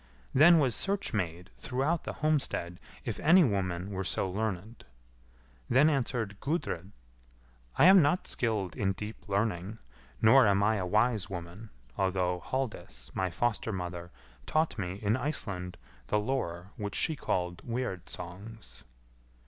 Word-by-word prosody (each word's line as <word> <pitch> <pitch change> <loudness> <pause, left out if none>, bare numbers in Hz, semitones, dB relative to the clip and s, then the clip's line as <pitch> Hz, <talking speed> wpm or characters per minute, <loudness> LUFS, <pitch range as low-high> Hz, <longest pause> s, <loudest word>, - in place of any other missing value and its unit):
Then 165 +5 +7
was 135 -6 +3
search 200 0 -1
made 90 -2 -3
throughout 140 +6 -1
the - - -4
homestead 135 - 0 0.3
if - - -3
any 175 +4 +6
woman 95 - -1
were 95 -1 -3
so 95 - -1
learned. 105 +2 -4 0.9
Then 145 +5 +5
answered 120 -7 -2
Gudrid, 120 - -3 0.9
"I - - +6
am 190 0 +9
not 150 +5 +2
skilled 105 -7 -1
in 95 -1 0
deep 105 +2 -8
learning, 100 0 -1 0.4
nor 125 +2 +6
am 100 0 +3
I 110 +1 +3
a 90 -2 -2
wise 110 +1 +2
woman, 90 +4 -7 0.3
although 90 -2 +1
Halldis, 110 - -4
my 95 -1 0
foster 115 +5 -1
mother, 90 -2 -5 0.4
taught 155 -6 +1
me, 90 -2 -2
in 105 +2 +2
Iceland, 100 -10 -4 0.3
the 105 - +1
lore 100 -6 -2
which 105 -1 -4
she 160 - +1
called 90 -9 -2
Weird 115 -7 -4
songs." 90 - -9
105 Hz, 140 wpm, -30 LUFS, 90-130 Hz, 0.9 s, am